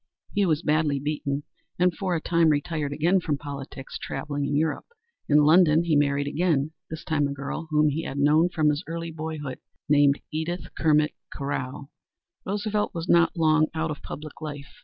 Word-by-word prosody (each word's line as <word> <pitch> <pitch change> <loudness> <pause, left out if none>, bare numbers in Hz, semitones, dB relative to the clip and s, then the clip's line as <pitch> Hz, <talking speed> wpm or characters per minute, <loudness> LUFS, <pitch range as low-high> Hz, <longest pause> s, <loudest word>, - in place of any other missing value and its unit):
He 200 -2 +2
was 155 0 +1
badly 150 -2 +2
beaten 145 0 -2 0.3
and 180 -1 +2
for 185 -3 -1
a - - 0
time 170 -1 +3
retired 150 0 -1
again 170 +6 +2
from 150 -5 -1
politics, 140 -2 -7
traveling 145 0 -3
in 145 - -1
Europe. 155 +1 0 0.4
In 150 0 +6
London 160 +1 +5
he 165 -3 +1
married 140 -1 +2
again, 155 -1 +1 0.2
this 160 - -6
time 150 -2 +1
a 140 - -4
girl 140 +4 -5
whom 150 -1 +3
he 150 +3 -2
had 140 - -5
known 150 +5 +4
from 155 -3 +2
his 150 +3 -1
early 165 0 -4
boyhood, 155 -4 -5 0.3
named 145 -1 +4
Edith 165 +3 -3
Kermit 150 -1 +3 0.2
Carow. 140 0 -4 0.6
Roosevelt 210 +1 -1
was 165 +1 -4
not 170 0 +4
long 155 -1 +4
out 160 0 -1
of 150 - -6
public 155 +1 -8
life. 145 -2 -7
155 Hz, 180 wpm, -26 LUFS, 145-165 Hz, 0.6 s, In